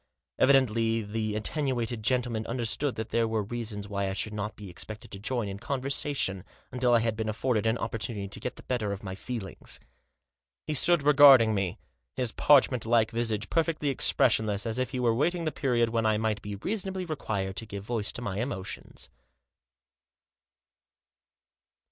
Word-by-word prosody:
Evidently 115 -4 +3
the 110 0 -3
attenuated 120 -1 -1
gentleman 120 -1 0
understood 120 +3 -2
that 110 0 -5
there 115 -1 +2
were 110 -1 -1
reasons 105 -2 -5
why 100 -1 -2
I - - -2
should 105 +2 -3
not 105 +1 -4
be 105 - -10
expected 110 +6 -7
to 100 - -7
join 120 +1 -2
in 100 0 -6
con 140 +5 -2
versation 135 -8 -2 0.3
until 125 -1 +2
I 115 - +4
had 115 -1 0
been 110 0 -2
afforded 115 0 0
an 110 +2 +2
opportunity 110 -3 -3
to 100 - -7
get 125 - -4
the - - -13
better 115 -5 -1
of 100 0 -5
my 95 -2 -5
feelings. 105 0 -4 0.9
He 155 - -2
stood 170 +2 +4
regarding 140 -6 +8
me, 95 -4 -1 0.4
his 125 -3 -1
parchment 130 -5 +4
like 115 -1 +3
visage 115 -3 -1
perfectly 160 -3 +1
expressionless, 110 -6 +2
as 115 +2 -2
if 130 - 0
he 130 -1 -4
were 120 -2 +3
awaiting 165 +8 0
the 155 - 0
period 120 -6 +1
when 115 -1 +1
I 110 -1 +3
might 110 -1 -1
be 105 0 -5
reasonably 190 - -3
required 100 - -3
to 115 - -5
give 100 -1 -6
voice 110 -1 -2
to 120 - -6
my 100 -3 -3
emotions. 110 -6 -5
115 Hz, 170 wpm, -28 LUFS, 105-130 Hz, 0.9 s, regarding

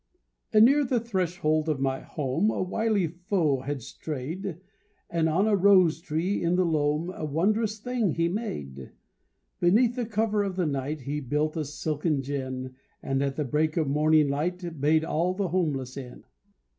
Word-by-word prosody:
Anear 250 +7 +6
the 250 -2 +1
threshold 175 -7 0
of 150 -3 0
my 135 0 0
home 150 +8 -1
A - - -2
wily 210 0 0
foe 170 -4 0
had 135 -1 -4
strayed, 160 - -5 0.5
And 165 -1 +1
on 185 +7 +2
a 215 - +4
rose 185 -4 +5
tree 170 +3 -1
in 170 +1 +2
the 185 0 +2
loam 155 +1 0
A 175 - -8
wondrous 210 +9 0
thing 230 - -1
he 165 0 +2
made; 75 - -5 0.7
Beneath 225 +7 +3
the 245 -3 -2
cover 215 -1 +1
of 195 -2 -2
the 180 -2 0
night 145 +1 -2
He 145 +3 -3
built 150 +4 -1
a 160 - -1
silken 150 0 -2
gin, 130 -2 -4 0.3
And 135 0 0
at 140 -1 -1
the 150 - -1
break 155 +4 0
of 160 -3 +1
morning 150 +1 +3
light 165 +2 -3
Bade 155 +2 +3
all 175 +4 0
the 195 -2 -1
homeless 145 -8 -1
in. 130 -3 -9
160 Hz, 170 wpm, -27 LUFS, 145-195 Hz, 0.7 s, Anear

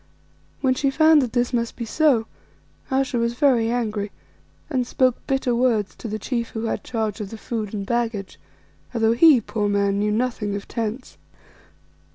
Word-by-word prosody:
When 260 -2 +3
she 275 +2 0
found 315 +2 +5
that 245 -4 -3
this 245 0 0
must 235 -1 -1
be 235 - -5
so, 255 -2 +2 0.6
Ayesha 265 -2 0
was 235 0 0
very 240 -4 +3
angry 215 -4 -1 0.6
and 255 -5 -1
spoke 255 -1 +2
bitter 265 -2 +1
words 235 -4 +1
to - - -7
the 215 0 -3
chief 235 +2 -3
who 220 - -5
had 225 - -2
charge 220 -3 -3
of 200 - -5
the 225 - -8
food 215 -2 -4
and 200 -2 -4
baggage, 225 -4 -2 0.6
although, 225 -1 +3
he, 285 +2 +7
poor 210 -1 -2
man, 200 0 +1
knew 210 +1 +1
nothing 220 -3 -1
of 200 - -6
tents. 230 +2 -5
235 Hz, 175 wpm, -23 LUFS, 215-255 Hz, 0.6 s, he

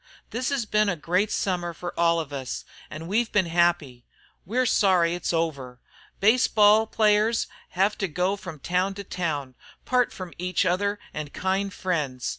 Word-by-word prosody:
This 250 +3 -2
hes 275 -5 -1
been 210 0 +2
a 180 - 0
great 180 +6 0
Summer 175 -3 -1
fer 175 +2 -5
us - - -10
all, 165 -5 0 0.4
an' 155 +1 -7
we've 220 +6 0
been 205 -4 +3
happy. 170 -7 +1 0.4
We're 250 +5 +1
sorry 185 -7 +3
it's 175 - -2
over. 140 -7 -2 0.4
Baseball 215 -1 +5
players 215 +1 +2 0.2
hev 195 +3 0
to 195 - 0
go 180 +4 0
from 180 -5 -9
town 180 +6 -1
to 200 - -6
town 155 -8 -3
an' 130 - -26 0.3
part 250 -1 +2
from 185 -3 -8
each 180 +1 0
other 200 +3 +1 0.2
an' 150 -1 -4
kind 190 +4 -1
friends. 150 -10 -2
180 Hz, 165 wpm, -25 LUFS, 165-205 Hz, 0.4 s, Baseball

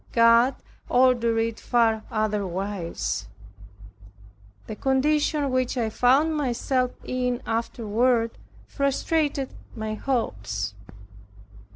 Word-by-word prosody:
God 235 +2 +5 0.3
ordered 245 -2 +3
it 225 0 -1
far 225 -3 +2
otherwise. 195 - -2 1.4
The 215 - -6
condition 285 +2 +1
which 255 0 0
I 225 -2 0
found 275 +8 +3
myself 255 -2 0 0.2
in 250 -1 -1
afterward, 230 +1 0 0.3
frustrated 280 0 0 0.3
my 220 -1 -3
hopes. 105 - -2
240 Hz, 80 wpm, -25 LUFS, 220-260 Hz, 1.4 s, God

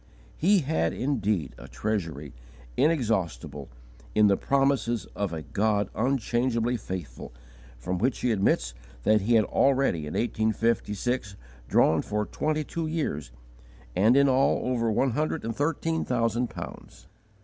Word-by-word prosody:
_ - - -31 0.3
He 195 +3 +3
had 135 - 0
indeed 105 - -1
a - - -10
Treasury, 85 -9 -3 0.4
inexhaustible 90 - 0 0.5
in 105 - +6
the 100 -1 +5
promises 135 -3 +1
of 100 -4 -2
a 80 -2 -5
God 100 - 0
unchangeably 120 0 0
faithful 90 - -6 0.5
from 90 +8 -3
which 130 +4 0
he 125 - +1
admits 80 - +1 0.3
that 110 - +4
he 115 +4 +2
had 110 -2 +4
already 135 - +2
in 75 - -6
1856 110 -1 0 0.3
drawn 80 -1 +3
for 105 0 -2
twenty 155 +5 -1
two 165 +2 -4
years, 145 - -2 0.7
and 110 +7 +4
in 140 0 +5
all 135 -1 +2
over 115 -2 +1
one 130 +4 +2
hundred 155 +1 -1
and 115 -1 -3
thirteen 160 +3 -1
thousand 120 0 0
pounds. - - -9
115 Hz, 140 wpm, -27 LUFS, 95-135 Hz, 0.7 s, in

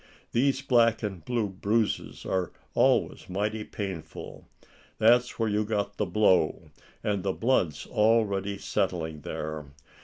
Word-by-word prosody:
These 135 +2 +2
black 120 -4 +3
and 95 -6 -4
blue 120 -1 0
bruises 105 +3 -1
are 95 -2 -1 0.2
always - - +2
mighty 105 +3 -1
painful. 95 -8 -7 0.5
That's 120 +3 +4
where 115 - +1
you 105 0 +1
got 105 -1 -2
the 105 - 0
blow, 90 -3 +2 0.3
and 100 -2 0
the 95 0 -1
blood's 90 - +1
already 105 -3 +2
settling 80 -6 -2
there. 75 0 -5
105 Hz, 125 wpm, -28 LUFS, 95-115 Hz, 0.5 s, That's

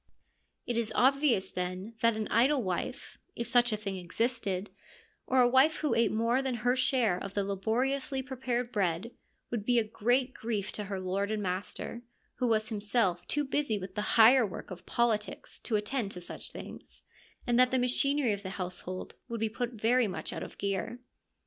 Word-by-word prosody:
It 240 - -1
is 230 -2 0
obvious, 265 -5 +3
then, 185 +4 -4
that 230 -1 +3
an 215 - -2
idle 260 +2 +3
wife 185 -2 -4
— - - -44
if 235 - -3
such 245 -1 +4
a 215 - 0
thing 200 -2 -4
existed 200 +1 -1 0.3
— - - -32
or 260 0 +4
a 245 - +6
wife 265 +5 +5
who 300 - 0
ate 230 -3 +3
more 230 +4 +2
than 265 -2 -1
her 245 +2 +1
share 250 -8 +2
of 200 0 -7
the 200 - +1
laboriously 255 +8 -1
prepared 250 -2 -2
bread, 190 +1 -1 0.4
would 235 -4 -2
be 245 +3 +2
a 230 - +4
great 245 +4 +1
grief 215 -3 -3
to 210 - -5
her 195 -1 -4
lord 190 +2 -1
and 215 -1 -2
master, 190 +5 -4 0.4
who 250 - +1
was 215 -1 +1
himself 205 -4 0
too 295 - +1
busy 270 -5 0
with 185 -1 -7
the 210 +3 -1
higher 235 +3 +8
work 195 -3 -6
of 180 -1 -9
politics 225 -3 -1
to 225 - -2
attend 210 +1 -1
to 180 - -7
such 175 - -5
things, - - -9 0.4
and 240 0 +2
that 255 0 +6
the 260 - +1
machinery 255 0 +2
of 200 - -5
the 190 - -6
house 180 -1 -4
hold 185 0 -6 0.2
would 230 -1 -3
be 220 0 0
put 245 +2 -3
very 230 +2 +2
much 190 - -5
out - - -5
of - - -8
gear. 200 +4 -2
225 Hz, 200 wpm, -30 LUFS, 200-250 Hz, 0.4 s, higher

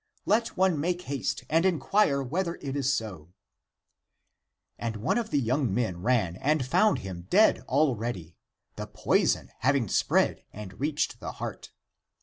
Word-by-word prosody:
Let 225 +3 +1
one 185 -4 +2
make 175 +3 -1
haste 135 - -3
and 165 +2 +2
inquire 170 -4 +2
whether 170 +6 -2
it 140 -1 -6
is 135 -1 +1
so! 95 - -5 1.4
And 115 -1 -3
one 115 - 0
of 225 -2 -4
the 145 - +1
young 130 -1 0
men 95 -5 -1
ran 100 -6 +1
and 150 +1 +1
found 210 +11 +3
him 90 -2 -7
dead 215 +4 +5
already, 120 - -1 0.4
the - - -5
poison - - +1
having 135 -2 +2
spread - - +1
and 100 -2 -10
reached 145 -3 -1
the - - -6
heart. - - -7
135 Hz, 145 wpm, -27 LUFS, 110-165 Hz, 1.4 s, dead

